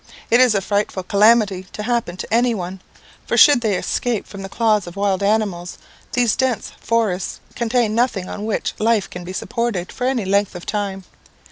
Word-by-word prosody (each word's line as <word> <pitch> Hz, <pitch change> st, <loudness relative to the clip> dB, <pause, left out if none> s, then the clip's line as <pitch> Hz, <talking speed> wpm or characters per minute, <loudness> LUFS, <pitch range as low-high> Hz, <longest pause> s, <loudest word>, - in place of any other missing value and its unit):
It 235 Hz, -, +6 dB
is 250 Hz, -4 st, +5 dB
a 200 Hz, -, +2 dB
frightful 200 Hz, -1 st, -1 dB
calamity 205 Hz, -2 st, +3 dB
to 210 Hz, -, -5 dB
happen 230 Hz, -6 st, -1 dB
to -, -, -5 dB
any 240 Hz, 0 st, +3 dB
one; 185 Hz, -1 st, -6 dB, 0.5 s
for -, -, 0 dB
should 285 Hz, -5 st, +7 dB
they 215 Hz, -4 st, +1 dB
escape 240 Hz, -4 st, -1 dB
from 200 Hz, -, -9 dB
the 195 Hz, -, -7 dB
claws 215 Hz, -3 st, +1 dB
of 175 Hz, -, -9 dB
wild 200 Hz, -1 st, 0 dB
animals, 200 Hz, -4 st, 0 dB, 0.4 s
these 245 Hz, -4 st, +2 dB
dense 260 Hz, -4 st, -1 dB
forests 215 Hz, -6 st, -1 dB
contain 235 Hz, -2 st, 0 dB
nothing 225 Hz, -5 st, 0 dB
on 210 Hz, -, -5 dB
which 220 Hz, -, -1 dB
life 220 Hz, -2 st, +2 dB
can 180 Hz, -, -8 dB
be 180 Hz, -, -7 dB
supported 215 Hz, -2 st, -2 dB
for 250 Hz, -, -2 dB
any 255 Hz, -6 st, 0 dB
length 200 Hz, 0 st, +1 dB
of 175 Hz, -, -8 dB
time. 200 Hz, -2 st, -3 dB
210 Hz, 190 wpm, -20 LUFS, 190-235 Hz, 0.5 s, should